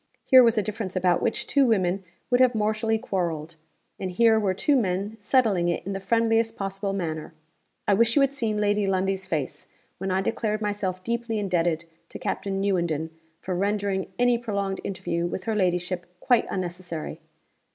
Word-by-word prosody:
Here 260 -1 +8
was 230 -2 +4
a 210 - +3
difference 210 -2 -4
about 180 -1 +2
which 230 - -1
two 280 -2 +3
women 190 -3 +1 0.3
would 245 +1 +4
have 255 -2 +5
mortally 220 +1 +1
quarreled; 170 -8 -3 0.4
and 190 - -3
here 220 +4 +4
were 195 -3 0
two 285 +9 +2
men 200 -2 0
settling 205 -6 +2
it 170 - -2
in 195 - -3
the 195 - -3
friendliest 225 +2 +2
possible 195 0 -3
manner. 160 -5 -4 0.5
I 205 - +5
wish 230 +3 +3
you 285 - +5
had 275 0 +3
seen 225 -6 -1
Lady 205 -1 +2
Lundie's 190 0 0
face, 150 -5 -3 0.3
when 195 - -2
I 190 +1 +1
declared 215 +1 -1
myself 200 -3 -2
deeply 235 0 -2
indebted 175 -5 0 0.2
to - - -7
Captain 195 -1 -2
Newenden 170 -5 0 0.3
for 185 - -3
rendering 200 0 -1
any 245 -1 +3
prolonged 200 -4 -2
interview 180 -3 -2
with 185 +2 -4
her 225 - -1
ladyship 180 -2 0
quite 245 +3 +3
unnecessary. 175 -3 -5
195 Hz, 170 wpm, -26 LUFS, 185-225 Hz, 0.5 s, Here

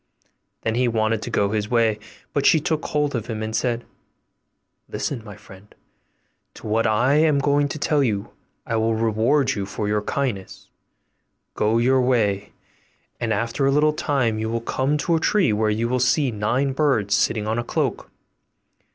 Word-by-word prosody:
Then 115 - 0
he 125 +2 +1
wanted 110 -1 0
to - - -5
go 100 0 +1
his 105 -1 -2
way; 115 -3 +2 0.3
but 140 -1 +2
she 160 - +5
took 155 +1 -2
hold 150 -1 0
of 115 - -3
him, 110 -1 -4
and 110 0 -3
said, 120 -1 -1 1.0
'Listen, 125 -6 -4
my 105 -3 -10
friend, 95 +2 -16 0.8
to - - -12
what 110 +2 +1
I 125 +7 +3
am 155 -2 +3
going 145 +1 +2
to 150 - -5
tell 150 -1 +1
you; 105 -5 -2 0.3
I 115 - -1
will 110 0 +1
reward 115 +5 +2
you 100 -2 -4
for 105 +1 -4
your 105 0 0
kindness; 110 -5 -4 0.8
go 110 +2 +1
your 130 +2 +3
way, 105 -6 +1 0.7
and - - -2
after 115 +7 0
a - - +3
little 150 +2 +3
time 130 -8 0
you 110 0 -2
will 115 0 -2
come 130 +5 0
to 160 +4 0
a - - +1
tree 175 - +2
where 110 +1 +1
you 110 +2 0
will 125 +1 0
see 125 +2 +2
nine 120 +6 0
birds 130 -9 +1
sitting 110 0 +1
on 110 +2 -1
a - - -2
cloak. - - -2
115 Hz, 180 wpm, -22 LUFS, 110-140 Hz, 1.0 s, she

